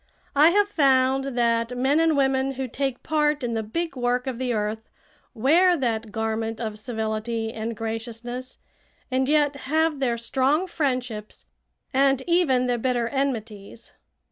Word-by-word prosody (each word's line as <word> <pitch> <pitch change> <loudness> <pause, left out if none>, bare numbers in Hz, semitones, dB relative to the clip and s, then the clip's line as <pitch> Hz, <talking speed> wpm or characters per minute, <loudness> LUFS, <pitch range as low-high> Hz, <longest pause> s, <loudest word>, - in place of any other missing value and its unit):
I 300 +3 +7
have 405 +3 +3
found 270 -5 +2
that 235 0 +1
men 270 +5 +2
and 325 -2 +3
women 270 0 +1
who 265 0 -4
take 270 +1 -3
part 300 -2 +1
in 235 -1 -1
the 225 - -1
big 320 +9 -3
work 250 0 0
of 255 -3 -4
the 255 -1 -1
earth 220 0 -3 0.5
wear 340 +10 +4
that 230 -5 -2
garment 220 0 -2
of 215 -2 -4
civility 225 0 -3
and 225 0 -4
graciousness, 230 +3 -5 0.5
and 260 +1 +1
yet 295 -1 +3
have 315 0 +1
their 240 -3 0
strong 270 +8 +1
friendships 250 - -3 0.5
and 270 0 +3
even 335 -8 +2
their 245 -1 0
bitter 240 -1 0
enmities. 230 -5 -4
255 Hz, 145 wpm, -24 LUFS, 230-280 Hz, 0.5 s, I